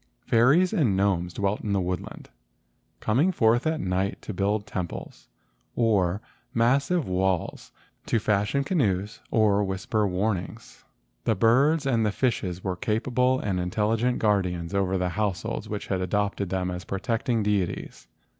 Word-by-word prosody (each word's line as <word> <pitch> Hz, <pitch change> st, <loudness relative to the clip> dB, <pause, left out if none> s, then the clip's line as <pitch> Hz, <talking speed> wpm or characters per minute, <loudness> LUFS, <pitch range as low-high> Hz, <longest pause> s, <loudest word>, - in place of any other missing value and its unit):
Fairies 140 Hz, +11 st, +4 dB
and 115 Hz, -, +2 dB
gnomes 95 Hz, -3 st, +1 dB
dwelt 100 Hz, +3 st, -1 dB
in 105 Hz, -, -2 dB
the 100 Hz, -, +2 dB
woodland, 90 Hz, 0 st, -5 dB, 0.7 s
coming 135 Hz, +12 st, +2 dB
forth 120 Hz, -2 st, +2 dB
at 160 Hz, 0 st, 0 dB
night 95 Hz, +1 st, -1 dB
to 110 Hz, -, -5 dB
build 100 Hz, +2 st, 0 dB
temples, 90 Hz, -5 st, -6 dB, 0.5 s
or 100 Hz, -5 st, +2 dB, 0.3 s
massive 140 Hz, +8 st, +2 dB
walls, 95 Hz, -1 st, -1 dB, 0.4 s
to -, -, +2 dB
fashion 105 Hz, +5 st, +1 dB
canoes, 105 Hz, -, -1 dB
or 105 Hz, -2 st, +3 dB
whisper 100 Hz, +2 st, -1 dB
warnings. 95 Hz, -1 st, -3 dB, 0.4 s
The 115 Hz, -, +2 dB
birds 135 Hz, -, +3 dB
and 120 Hz, -4 st, +2 dB
the 105 Hz, -, +1 dB
fishes 95 Hz, -7 st, -1 dB
were 95 Hz, -2 st, -2 dB
capable 125 Hz, +4 st, +1 dB
and 95 Hz, -3 st, -1 dB
intel¬ 105 Hz, +5 st, 0 dB
ligent 120 Hz, +2 st, 0 dB
guardians 90 Hz, -5 st, 0 dB
over 95 Hz, -1 st, +1 dB
the 90 Hz, 0 st, 0 dB
households 105 Hz, +2 st, -2 dB
which 105 Hz, -1 st, -4 dB
had 95 Hz, -1 st, -2 dB
adopted 100 Hz, 0 st, -1 dB
them 90 Hz, -1 st, -1 dB
as 90 Hz, 0 st, -5 dB
protecting 115 Hz, +4 st, -1 dB
deities. 95 Hz, -11 st, -2 dB
105 Hz, 145 wpm, -26 LUFS, 95-115 Hz, 0.7 s, Fairies